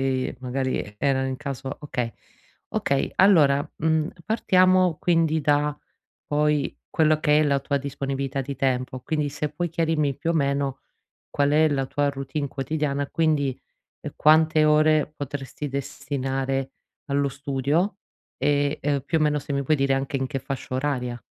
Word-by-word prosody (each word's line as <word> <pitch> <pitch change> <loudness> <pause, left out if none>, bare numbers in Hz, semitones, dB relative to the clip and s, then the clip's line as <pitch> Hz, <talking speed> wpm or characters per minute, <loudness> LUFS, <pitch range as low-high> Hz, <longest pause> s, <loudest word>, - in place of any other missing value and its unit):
e 130 -1 -1
magari 130 -5 -2
erano 135 -1 +1
in 130 -1 -3
caso 135 -1 -5
okay. 125 -5 -3 0.6
Okay, 140 -1 0
allora, 150 -7 +5
mhmmm, 160 0 +1 0.2
partiamo 185 -5 +3
quindi 165 -2 +2
da, 145 0 +1 0.5
poi, 150 0 +1 0.2
quello 155 -1 +3
che 150 -1 +4
è - - +4
la 140 -2 +2
tua 140 +1 -1
disponibilità 140 -1 -3
di 140 0 -6
tempo. 130 -1 -1
Quindi 150 +2 -1
se 145 +1 -3
puoi 175 +4 -2
chiarirmi, 160 -4 0
più 165 - -2
o - - +2
meno, 140 -2 0 0.5
qual 145 0 +1
è 155 +1 +5
la 135 -2 0
tua 145 +1 0
routine 140 +1 -4
quotidiana, 140 +1 -2
quindi 150 -5 +1 0.6
quante 155 0 +5
ore 155 0 +4
potresti 140 0 -5
destinare 135 0 -3 0.3
allo 140 0 +1
studio 140 +8 -1 0.4
e, 145 +1 +1
ehm, 145 -1 0
più 165 - +1
o - - -3
meno 150 -1 +2
se 140 0 -6
mi 140 - 0
puoi 155 +3 +2
dire 135 0 +2
anche 135 +1 -2
in 135 0 -1
che 135 - -3
fascia 135 -2 -5
oraria. 125 -3 -2
145 Hz, 155 wpm, -24 LUFS, 135-155 Hz, 0.6 s, allora